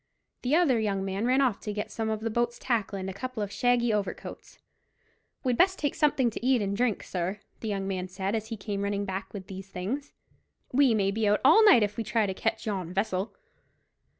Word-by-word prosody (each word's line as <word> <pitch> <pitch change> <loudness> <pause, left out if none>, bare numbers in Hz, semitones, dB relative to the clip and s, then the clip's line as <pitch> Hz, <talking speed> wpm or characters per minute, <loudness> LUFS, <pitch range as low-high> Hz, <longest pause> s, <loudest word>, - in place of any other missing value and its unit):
The 260 +4 +2
other 305 -9 +4
young 200 -3 -1
man 195 +4 -1
ran 260 +2 +4
off 245 -7 +2
to 210 - -5
get 210 0 -4
some 225 -1 -2
of 215 -1 -2
the 225 0 -2
boat's 240 +1 0
tackle 220 -5 -1
and 190 0 -4
a 190 - -4
couple 235 +2 -4
of 200 - -5
shaggy 240 0 +2
overcoats. 205 -2 -4 0.9
"We'd 250 -3 0
best 375 +1 +4
take 290 -2 -1
something 275 -6 +2
to 225 - -7
eat 255 -1 +4
and 200 -1 -1
drink, 235 -1 0
sir," 185 +3 -3 0.2
the 225 - -5
young 195 -2 -2
man 185 -1 -2
said, 190 +2 -3
as 220 -1 -2
he 225 -1 -5
came 200 0 -4
running 200 0 -1
back 190 0 -4
with 195 -3 -7
these 195 -1 -9
things; 215 +11 -4 0.6
"we 265 -3 +5
may 195 -2 +2
be 215 +1 0
out 205 +1 +3
all 330 +11 +8
night, 370 - +7
if 205 0 -2
we 230 - -1
try 215 +1 +1
to 190 - -2
catch 225 +3 -2
yon 190 -5 -3
vessel." 190 +1 -1
215 Hz, 225 wpm, -28 LUFS, 195-245 Hz, 0.9 s, all